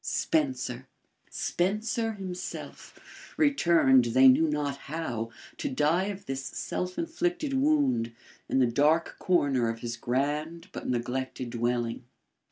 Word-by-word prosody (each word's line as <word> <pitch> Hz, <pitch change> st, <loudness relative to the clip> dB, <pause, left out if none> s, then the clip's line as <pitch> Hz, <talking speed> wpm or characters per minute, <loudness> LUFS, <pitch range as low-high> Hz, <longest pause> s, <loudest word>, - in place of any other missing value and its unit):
Spencer! 295 Hz, -5 st, -1 dB, 0.4 s
Spencer 215 Hz, +5 st, -1 dB
himself, 185 Hz, -3 st, -9 dB
returned 170 Hz, -, +4 dB
they 130 Hz, +3 st, +6 dB
knew 160 Hz, +5 st, +5 dB
not 145 Hz, -2 st, -1 dB
how, 135 Hz, -7 st, -4 dB, 0.3 s
to -, -, -2 dB
die 155 Hz, +7 st, +2 dB
of 200 Hz, -1 st, -5 dB
this 135 Hz, 0 st, -4 dB
self 180 Hz, +6 st, -4 dB
inflicted 335 Hz, -2 st, -1 dB
wound, 270 Hz, -, +2 dB, 0.4 s
in -, -, +1 dB
the 130 Hz, -, +5 dB
dark 150 Hz, +7 st, +2 dB
corner 140 Hz, -10 st, +2 dB
of 115 Hz, 0 st, -5 dB
his 120 Hz, -1 st, -4 dB
grand 150 Hz, +8 st, -2 dB
but -, -, -6 dB
neglected 125 Hz, 0 st, -3 dB
dwelling. 120 Hz, 0 st, -1 dB
150 Hz, 120 wpm, -28 LUFS, 125-200 Hz, 0.4 s, they